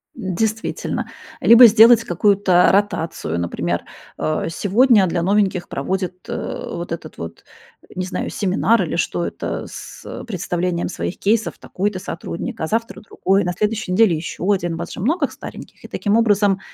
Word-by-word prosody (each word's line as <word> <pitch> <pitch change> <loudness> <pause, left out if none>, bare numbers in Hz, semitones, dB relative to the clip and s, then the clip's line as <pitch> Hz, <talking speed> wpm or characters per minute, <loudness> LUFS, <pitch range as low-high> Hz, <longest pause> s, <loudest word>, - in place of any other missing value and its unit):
Действительно. 220 +1 -2 0.3
Либо 235 +2 +9
сделать 230 +1 +7
какую-то 190 -1 +3
ротацию. 170 - -1
Например, 85 0 -2 0.4
э, 155 0 -1
сегодня 210 +3 +4
для 170 0 -1
новеньких 195 -2 +1
проводит, 185 +4 -4
э, - - -4
вот 170 0 -6
этот 165 -2 -6
вот, 85 0 -8 0.5
не 185 - -2
знаю, 185 - -3
семинар 210 +4 +1
или - - -3
что - - -1
это, - - -4
с, - - -10
э, - - -7
представлением 180 -4 -2
своих 180 - -4
кейсов 220 +2 0
такой-то 200 +1 -3
сотрудник, 185 +5 -6
а 160 - -1
завтра 225 0 -2
другой, 195 -2 0
на 180 - -2
следующей 210 +1 -2
неделе 190 -2 +4
ещё 165 +3 -5
1. 175 -4 0
У - - -6
вас - - -6
же - - -8
много 285 - +1
стареньких. - - -11
И - - -9
таким 205 0 0
образом, 205 -4 +3
195 Hz, 160 wpm, -20 LUFS, 175-220 Hz, 0.5 s, Либо